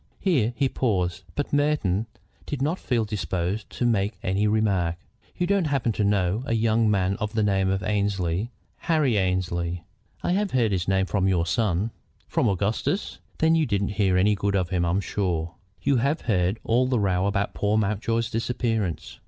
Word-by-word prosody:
Here 130 - +1
he 135 +1 +2
paused, 95 -10 -1
but 145 - -3
Merton 145 -9 +1 0.4
did 145 - -3
not 155 +7 0
feel 120 -4 0
disposed 95 0 -3
to 120 - -2
make 105 -2 +1
any 95 +3 +1
remark. 100 -6 +1 0.4
"You 175 - +1
don't 195 -1 +2
happen 135 -5 +1
to 105 - -1
know 100 0 +1
a 115 - +1
young 110 0 +2
man 95 -1 +1
of 105 0 -3
the 110 -1 +1
name 95 -2 +2
of 95 0 -1
Annesley, 100 -1 0 0.3
Harry 155 -8 +1
Annesley?" 90 -3 -1 0.4
"I - - 0
have 200 +2 +1
heard 120 -5 +2
his 90 -2 -1
name 95 0 +2
from 95 0 0
your 90 -3 +2
son." 100 +3 0 0.4
"From 115 - +1
Augustus? 100 - -1 0.2
Then 160 +1 +3
you 160 -2 +2
didn't 100 -3 0
hear 100 -3 +1
any 100 +3 +4
good 100 0 -1
of 90 -3 0
him, 90 -2 0
I'm 90 +4 +1
sure. 85 -5 -2 0.3
You 140 - +3
have 140 +7 0
heard 95 -2 +1
all 125 +3 +2
the 125 -2 +1
row 95 -1 +1
about 100 0 -1
poor 105 +1 +1
Mountjoy's 110 +2 0
disappearance?" 115 - -2
105 Hz, 180 wpm, -25 LUFS, 95-115 Hz, 0.4 s, any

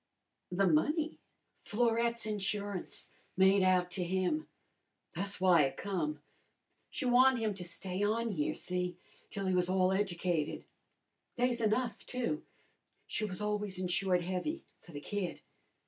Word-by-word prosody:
"The 195 +2 +2
money?" 300 - +1 0.4
"Florette's 235 +1 +1
insurance 205 -2 -3 0.3
made 190 +1 +5
out 185 -1 +3
to 180 +1 -1
him. 185 - 0 0.7
Tha's 195 +3 -1
w'y 180 -5 +5
I - - -2
come. 150 -4 -3 0.7
She 270 - -4
wan'ed 255 +1 +6
him 220 -2 0
to 190 -2 -7
stay 180 +2 -3
on 225 +2 +1
here, 150 -6 -1
see, 180 -1 -2 0.3
till 200 -1 -4
he 185 - +1
was 180 0 +2
all 185 0 +3
educated. 175 -5 -1 0.7
They's 245 -1 +1
enough, 225 +2 0
too. 250 +4 -2 0.6
She 215 - -1
was 195 -1 -3
always 210 -2 -1
insured 180 0 +1
heavy 185 - -3 0.2
for 175 - -14
the 145 -2 -7
kid. 190 0 -3
195 Hz, 135 wpm, -33 LUFS, 180-220 Hz, 0.7 s, wan'ed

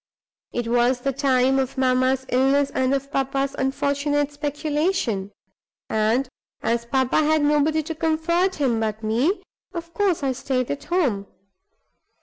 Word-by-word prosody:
It 240 -1 -3
was 245 +1 +2
the 275 +1 -1
time 265 0 +2
of 265 -1 -2
mamma's 260 0 +2
illness 270 +2 +2
and 260 0 +1
of 275 +1 -4
papa's 275 0 -1
unfortunate 285 +2 0
speculation; 290 - -1 0.6
and 220 +5 +1 0.4
as 235 +1 0
papa 260 0 +1
had 310 0 +2
nobody 300 +1 +2
to 325 +2 -4
comfort 330 +3 +1
him 255 -6 +1
but 220 0 -2
me, 245 - +1 0.3
of 335 0 -6
course 370 -4 +1
I 270 - +1
stayed 255 -1 -2
at 285 - -5
home. 260 - 0
270 Hz, 135 wpm, -23 LUFS, 250-300 Hz, 0.6 s, was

